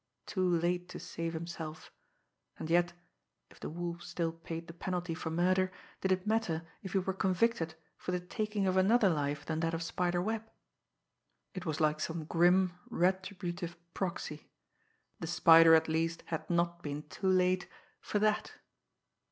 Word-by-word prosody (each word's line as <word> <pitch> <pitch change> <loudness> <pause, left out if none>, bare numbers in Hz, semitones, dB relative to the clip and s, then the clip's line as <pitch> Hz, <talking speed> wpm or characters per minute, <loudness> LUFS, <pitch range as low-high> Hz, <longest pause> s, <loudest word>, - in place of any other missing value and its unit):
Too 185 -2 0
late 175 +1 0
to - - -7
save 165 0 -4
himself 160 -1 -6 0.7
and 160 - -5
yet, 175 0 +3 0.6
if - - -17
the - - -5
Wolf 170 +1 -4
still 165 -2 -2
paid 165 0 -7
the 165 - -10
penalty 180 0 -3
for 160 - -4
murder, 185 +3 +2 0.3
did 190 - 0
it 185 0 +1
matter 210 -7 0 0.2
if 190 - -7
he - - +3
were 190 0 0
convicted 185 -3 +1 0.2
for - - -4
the 180 - 0
taking 210 +3 -2
of 185 0 +2
another 205 +2 +5
life 145 -3 -1
than 160 -1 -2
that 165 0 0
of 165 - -3
Spider 175 +1 0
Webb! 220 +4 -2 1.0
It 185 -2 -6
was 155 -1 -1
like 155 -1 +2
some 160 0 -3
grim, 175 +3 +4 0.2
retributive 180 -1 -1 0.2
proxy! 170 -5 -4 0.7
The 165 - -4
Spider, 165 -1 +8
at 160 0 +3
least, 165 +1 0
had 160 - -4
not 170 0 +1
been 150 -2 -4
too 190 +5 -4
late 185 0 +3 0.3
for - - -2
that! 215 0 +1
175 Hz, 160 wpm, -33 LUFS, 165-185 Hz, 1.0 s, Spider